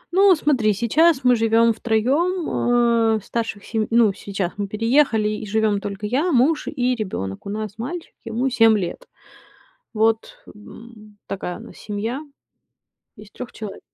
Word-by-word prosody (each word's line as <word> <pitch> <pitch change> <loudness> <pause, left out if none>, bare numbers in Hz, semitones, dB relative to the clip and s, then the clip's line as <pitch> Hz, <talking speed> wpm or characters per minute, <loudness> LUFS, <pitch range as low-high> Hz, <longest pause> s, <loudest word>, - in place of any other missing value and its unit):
Ну, 390 -1 +6
смотри, 250 -9 +2
сейчас 265 - +2
мы 250 -1 +5
живем 225 0 +3
втроем. 240 - +1
Э, - - -1
старших 225 -3 -4
сей 220 -1 -2
ну, 230 -3 +4
сейчас 195 -3 -4
мы 200 -1 -2
переехали 225 +1 +2
и 215 0 -5
живем 215 -1 +1
только 205 +1 -5
я, 285 +11 0
муж 290 +5 +2
и 250 0 0
ребенок. 185 - -5
У - - -4
нас 215 0 -5
мальчик, 325 +8 -6
ему 230 +3 -2
7 225 -2 +5
лет. 175 -3 -5 0.9
Вот, 220 +1 +1 0.2
м, 215 0 -14
такая 185 -1 -5
у - - -13
нас - - -13
семья 220 +5 -4 1.0
из 210 0 -14
3 250 - -9
человек. 210 -3 -8
225 Hz, 150 wpm, -22 LUFS, 210-250 Hz, 1.0 s, Ну